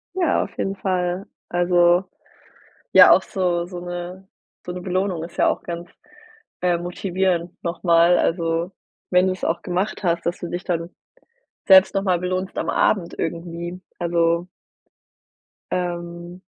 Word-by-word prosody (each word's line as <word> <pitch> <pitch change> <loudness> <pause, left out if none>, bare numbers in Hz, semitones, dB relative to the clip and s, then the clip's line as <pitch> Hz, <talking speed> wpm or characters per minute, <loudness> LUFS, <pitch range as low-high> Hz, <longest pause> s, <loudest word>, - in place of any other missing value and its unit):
Ja, 355 -4 +2
auf - - -11
jeden 195 - -2
Fall. 185 -1 -2 0.2
Also, 175 0 +3 0.9
ja, - - +9
auch - - +6
so 175 -4 -1
so 180 0 -7
'ne 175 +2 -7 0.4
so 180 - -4
'ne 180 0 -6
Belohnung 185 -2 -1
ist 170 +1 -10
ja - - +4
auch - - 0
ganz, 170 0 -6 0.7
äh, 175 -1 +2
motivierend 175 0 -1
nochmal. 170 0 +3
Also, 165 +1 0 0.4
wenn 180 +1 +4
du 185 - +1
es 185 - -12
auch 165 - 0
gemacht 185 +4 -2
hast, 170 -2 0
dass 175 - -1
du 175 - -5
dich 175 +1 -4
dann 170 -1 -2 0.8
selbst 190 0 +7
nochmal 195 -2 +1
belohnst 185 +1 -3
am - - -2
Abend 185 -5 +1
irgendwie. 170 +1 -4 0.2
Also 170 0 +1 1.2
ähm, 175 0 -4
175 Hz, 140 wpm, -22 LUFS, 170-185 Hz, 1.2 s, ja